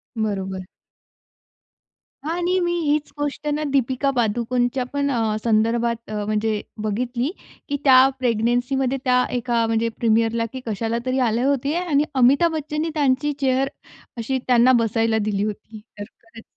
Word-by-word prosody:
बरोबर. 190 -4 -3 1.6
आणि 355 +2 0
मी 345 -1 0
हीच 300 -1 0
गोष्ट 290 0 -3
ना, 300 +1 -2
दीपिका 270 0 +1
पादुकोणच्या 245 +2 0
पण 285 0 0
अ, 225 -4 0
संदर्भात 230 +1 +2
अ, - - -5
म्हणजे 215 0 -1 0.2
बघितली, 240 +5 -1 0.4
की 285 - 0
त्या 260 -1 +7
प्रेग्नन्सीमध्ये 245 +3 0
त्या 250 0 +3
एका 240 -2 0
म्हणजे 225 +1 0
प्रीमियरला, 230 0 +2
की 260 - -5
कशाला 225 +1 -2
तरी 260 +1 0
आले 230 +3 0
होते. 280 +1 +1
आणि 335 -5 +1
अमिताभ 275 +7 +4
बच्चननी 305 +1 -2
त्यांची 290 -1 +1
चेअर 270 0 +1 0.5
अशी 260 +3 -2
त्यांना 250 0 +5
बसायला 225 0 +1
दिली 205 -2 -1
होती. 215 +1 -6 0.2
तर 205 - -5
खरंच 225 -1 -16
245 Hz, 140 wpm, -22 LUFS, 225-275 Hz, 1.6 s, त्या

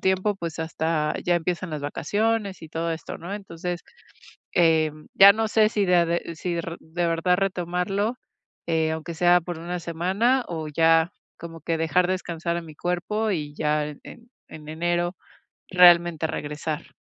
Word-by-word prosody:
tiempo, 190 +2 +1
pues, 170 -4 -6
hasta 160 -1 -1
ya 175 - +3
empiezan 175 +2 -2
las 150 -2 -4
vacaciones 205 +7 -1
y 160 - -9
todo 165 +1 -2
esto, 160 - -7
¿no?, 175 +4 -6
entonces, 180 -3 -5 0.7
em, 155 -2 +2
ya 200 +1 +9
no 220 +1 0
sé 215 0 +4
si 205 -3 0
de 180 - +3
a 170 -1 +4
de 170 0 -2
si 175 +2 -3
r 170 0 -4
de 170 +2 -2
verdad 170 +2 +2
retomarlo, 195 +4 -1 0.5
eh, 160 -1 +1
aunque 160 +1 -5
sea 175 +1 +4
por 175 0 -6
1 175 +2 -4
semana 190 +10 +1
o 160 -3 -4
ya 165 +3 +3 0.3
como 165 -1 -9
que 165 +2 -1
dejar 165 +3 +2
descansar 170 -2 -2
a - - -3
mi 160 -2 -12
cuerpo 195 +7 -1
y 150 -5 -3
ya 150 0 0
en 150 -1 -9
en 235 0 -13 0.2
en 150 -1 -10
enero 175 +2 -1 0.6
realmente 175 -3 +6
regresar. 150 0 -5
170 Hz, 170 wpm, -25 LUFS, 160-185 Hz, 0.7 s, ya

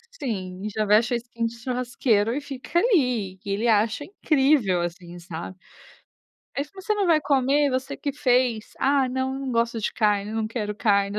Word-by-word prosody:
Sim, 195 - -4
já 215 0 -1
veste 220 +4 +4
a - - +2
skin 235 -1 -3
de 230 - -8
churrasqueiro 245 -2 0
e - - 0
fica 280 +3 -5
ali, 250 - +2
e 205 - -7
ele 210 +4 0
acha 220 +5 +2
incrível, 270 - +2
assim, 175 0 -6
sabe. 175 +1 -7 1.0
Eh, 280 - +1
"Mas 380 -1 -10
você 425 - +1
não 405 -3 0
vai 320 -3 +4
comer? 280 0 +2
Você 260 +1 -2
que 285 - -3
fez". 250 -5 +1
"Ah 275 -1 +3
não, 260 +1 -1
não 270 -2 -4
gosto 230 0 +1
de 215 - -2
carne, 210 -1 +1
não 220 -1 -1
quero 210 -3 -3
carne". 200 -1 +1
235 Hz, 180 wpm, -24 LUFS, 210-270 Hz, 1.0 s, veste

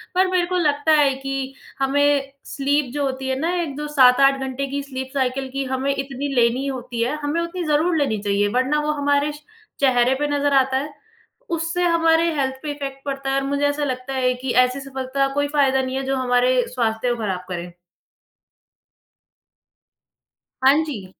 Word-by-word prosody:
पर 375 0 +4
मेरे 360 -1 +2
को 365 0 -1
लगता 295 -1 +1
है 275 -2 +3
कि 270 0 -3 0.3
हमें 280 0 +2
स्लीप 280 -2 -1
जो 290 -1 -1
होती 265 0 -3
है 260 - 0
ना 335 +3 0
एक 285 -5 -4
जो 300 0 -4
7-8 275 -1 +5
घंटे 265 +1 -3
की 280 0 -2
स्लीप 265 -1 -6
साइकिल 265 0 -1
की 275 0 -1
हमें 265 +1 -1
इतनी 275 +1 -4
लेनी 240 +3 +2
होती 250 -3 -4
है, 250 +6 0
हमें 295 +4 -1
उतनी 345 +1 -4
ज़रूर 315 +3 +2
लेनी 270 -7 +1
चाहिए, 205 0 +1
वरना 260 +4 +1
वो 300 0 0
हमारे 285 +1 +2
श 295 0 -12 0.4
चेहरे 255 -2 +3
पे 295 +2 -1
नज़र 285 0 +1
आता 265 -1 +3
है। 290 +3 -3 0.6
उससे 335 +2 -1
हमारे 330 -1 +3
हेल्थ 265 -2 -1
पे 295 - -3
इफेक्ट 275 -2 -6
पड़ता 275 -1 -3
है 270 - +1
और 275 - 0
मुझे 285 +1 0
ऐसा 290 +1 -1
लगता 260 0 -3
है 255 -1 +1
कि 265 -2 -2
ऐसी 250 +2 -4
सफलता 270 0 -2
का 275 - -7
कोई 285 0 0
फ़ायदा 265 -1 +3
नहीं 260 0 -3
है 270 - -2
जो 270 0 0
हमारे 250 0 +2
स्वास्थ्य 235 -1 -1
को - - -6
ख़राब 185 -3 -2
करे। 175 0 -5 2.9
हाँ 285 +4 +6
जी। 220 -11 -6
275 Hz, 190 wpm, -21 LUFS, 260-290 Hz, 2.9 s, हाँ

